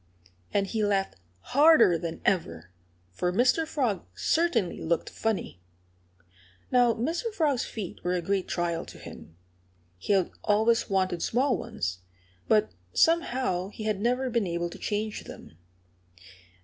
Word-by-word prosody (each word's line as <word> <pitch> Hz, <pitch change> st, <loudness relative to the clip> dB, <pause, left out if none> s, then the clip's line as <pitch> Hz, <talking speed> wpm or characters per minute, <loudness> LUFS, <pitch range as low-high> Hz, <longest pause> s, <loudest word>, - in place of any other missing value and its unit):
And 200 Hz, -, +1 dB
he 215 Hz, +2 st, -2 dB
laughed 195 Hz, -2 st, 0 dB, 0.4 s
harder 285 Hz, -, +6 dB
than 165 Hz, 0 st, -4 dB
ever; 90 Hz, -, -1 dB, 0.4 s
for 180 Hz, -, -1 dB
Mr. 250 Hz, -, +2 dB
Frog 245 Hz, -, -1 dB
certainly 330 Hz, -, +1 dB
looked 165 Hz, 0 st, -1 dB
funny. 215 Hz, -, -3 dB, 1.1 s
Now, 245 Hz, -2 st, +4 dB
Mr. 330 Hz, -, -2 dB
Frog's 300 Hz, -, +1 dB
feet 205 Hz, -6 st, -7 dB
were 180 Hz, +1 st, 0 dB
a 180 Hz, -, -1 dB
great 195 Hz, +1 st, -1 dB
trial 170 Hz, -1 st, -1 dB
to -, -, -11 dB
him. 80 Hz, -, -12 dB, 0.6 s
He 205 Hz, -, 0 dB
had 190 Hz, -3 st, +2 dB
always 220 Hz, +3 st, +2 dB
wanted 185 Hz, -3 st, 0 dB
small 260 Hz, +3 st, +1 dB
ones. 90 Hz, +1 st, -4 dB, 0.5 s
But 215 Hz, -1 st, +3 dB, 0.2 s
somehow 255 Hz, -, +2 dB
he 215 Hz, -, -8 dB
had 215 Hz, -2 st, -1 dB
never 250 Hz, +3 st, 0 dB
been 230 Hz, -4 st, +1 dB
able 170 Hz, 0 st, -2 dB
to -, -, -10 dB
change 210 Hz, 0 st, -3 dB
them. -, -, -11 dB
205 Hz, 135 wpm, -27 LUFS, 180-250 Hz, 1.1 s, harder